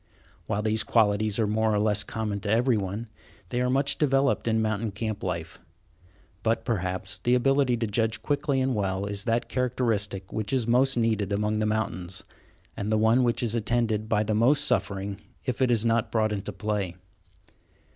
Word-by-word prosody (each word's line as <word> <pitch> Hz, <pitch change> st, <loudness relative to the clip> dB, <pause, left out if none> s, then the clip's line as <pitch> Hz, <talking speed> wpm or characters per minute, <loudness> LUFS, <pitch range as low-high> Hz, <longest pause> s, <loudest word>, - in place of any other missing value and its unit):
While 105 Hz, +1 st, -1 dB
these 110 Hz, 0 st, +1 dB
qualities 110 Hz, -2 st, +2 dB
are 115 Hz, -, +2 dB
more 110 Hz, +1 st, +1 dB
or 105 Hz, -, +2 dB
less 105 Hz, -1 st, +2 dB
common 105 Hz, -1 st, -3 dB
to 100 Hz, +1 st, -5 dB
every 120 Hz, +3 st, +3 dB
one, 100 Hz, +2 st, -3 dB, 0.4 s
they 120 Hz, -, -1 dB
are 125 Hz, -, +1 dB
much 135 Hz, +2 st, +1 dB
developed 135 Hz, -3 st, +2 dB
in 110 Hz, 0 st, +2 dB
mountain 110 Hz, 0 st, -1 dB
camp 105 Hz, +1 st, -4 dB
life. 85 Hz, -3 st, -4 dB, 0.8 s
But, 115 Hz, +2 st, 0 dB
perhaps, 95 Hz, -4 st, -2 dB
the 120 Hz, +1 st, +2 dB
ability 135 Hz, -1 st, +2 dB
to 115 Hz, -, -1 dB
judge 110 Hz, +1 st, -1 dB
quickly 145 Hz, -2 st, 0 dB
and 130 Hz, 0 st, +1 dB
well 100 Hz, -2 st, -1 dB
is 100 Hz, -1 st, -3 dB
that 115 Hz, 0 st, 0 dB
characteristic 115 Hz, -6 st, -2 dB
which 110 Hz, +2 st, -2 dB
is 130 Hz, -4 st, +1 dB
most 125 Hz, +3 st, +3 dB
needed 110 Hz, -4 st, +1 dB
among 105 Hz, +1 st, 0 dB
the 110 Hz, -, +1 dB
mountains, 95 Hz, -4 st, -3 dB, 0.5 s
and 105 Hz, +2 st, -3 dB
the 110 Hz, -, +3 dB
one 110 Hz, +4 st, +4 dB
which 120 Hz, 0 st, +1 dB
is 115 Hz, -2 st, 0 dB
attended 115 Hz, -1 st, 0 dB
by 105 Hz, -2 st, +2 dB
the 110 Hz, 0 st, -1 dB
most 130 Hz, +7 st, +3 dB
suffering 100 Hz, -6 st, -1 dB, 0.2 s
if 125 Hz, 0 st, -2 dB
it 130 Hz, -, +3 dB
is 115 Hz, -2 st, +2 dB
not 115 Hz, 0 st, +1 dB
brought 110 Hz, -2 st, +1 dB
into 100 Hz, -2 st, -4 dB
play. 105 Hz, -4 st, -2 dB
110 Hz, 185 wpm, -27 LUFS, 105-120 Hz, 0.8 s, one